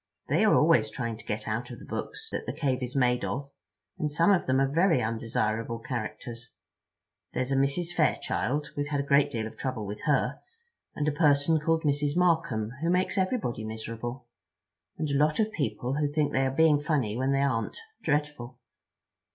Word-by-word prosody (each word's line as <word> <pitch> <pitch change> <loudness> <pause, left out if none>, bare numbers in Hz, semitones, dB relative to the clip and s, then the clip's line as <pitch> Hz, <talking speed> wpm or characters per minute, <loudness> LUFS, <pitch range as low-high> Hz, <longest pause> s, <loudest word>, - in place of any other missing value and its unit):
They - - +3
are - - +5
always - - +4
trying 115 -2 -4
to 110 - -14
get 105 0 -3
out 115 +3 -2
of 120 - -8
the - - -12
books 445 - -5
that - - -4
the - - -2
cave 135 -4 -1
is 125 +1 -4
made 125 -2 +2
of; 140 +1 -3 0.5
and 150 -1 -1
some 165 +6 +4
of 190 - +2
them 130 +1 +3
are 135 - +3
very 165 +2 +3
undesirable 115 0 -1
characters. 120 -1 -6 0.8
There's 130 +1 -1
a - - +2
Mrs. 140 +6 +1
Fairchild—we've 145 -3 0
had 145 -1 -1
a - - -3
great 140 +1 +4
deal 115 -5 -3
of 110 - -8
trouble 130 -5 -3
with 105 +1 -6
her, 140 -2 +1 0.6
and 150 - -1
a - - +3
person 145 +1 +3
called 160 +1 +1
Mrs. 145 +1 +1
Markham 160 -12 +2
who 165 - +1
makes 180 +1 +1
everybody 185 - -1
miserable, 115 +3 -5 0.7
and 155 - -1
a - - +1
lot 150 +5 +2
of 220 0 +2
people 135 - -2
who 145 -1 0
think 150 -1 +1
they 135 0 +2
are - - -1
being 155 +1 +4
funny 145 -8 0
when 130 +3 0
they 140 0 +2
aren't—dreadful." 150 - -2
140 Hz, 185 wpm, -28 LUFS, 120-150 Hz, 0.8 s, are